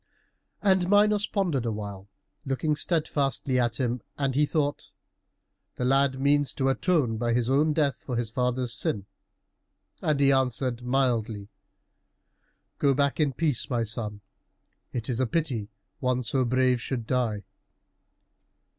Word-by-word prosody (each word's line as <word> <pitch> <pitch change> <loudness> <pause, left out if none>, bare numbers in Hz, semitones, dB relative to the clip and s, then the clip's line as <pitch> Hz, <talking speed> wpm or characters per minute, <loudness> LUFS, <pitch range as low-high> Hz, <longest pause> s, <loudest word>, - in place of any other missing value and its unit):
And 190 -3 +3
Minos 205 0 +4
pondered 175 - 0
a 115 - -1
while, 100 -2 -6 0.3
looking 145 +2 0
steadfastly 145 -5 0
at 120 0 0
him, 125 -2 -1 0.2
and 135 -2 0
he 150 +2 +2
thought, 145 -2 -1 0.8
"The 125 - -2
lad 135 0 +2
means 145 +1 +2
to 135 -1 +1
atone 135 - +1
by 120 +1 0
his 120 +1 +1
own 150 +3 +3
death 145 -3 +1
for 125 - -5
his 115 -2 -2
father's 125 0 0
sin;" 100 -3 -2 1.0
and 150 -2 +1
he 140 -1 +5
answered 130 -2 0
mildly, 120 -5 0 1.3
"Go 140 -2 +3
back 140 +2 +1
in 145 -3 +2
peace, 150 -4 -1
my 120 -2 0
son. 105 -2 -3 0.7
It 115 -2 -4
is 125 -2 -1
a 130 - +2
pity 130 -7 -1
that - - -24 0.3
one 125 -1 0
so 130 +3 +1
brave 130 0 +2
should 120 -3 -3
die." 115 -5 0
130 Hz, 145 wpm, -27 LUFS, 120-145 Hz, 1.3 s, he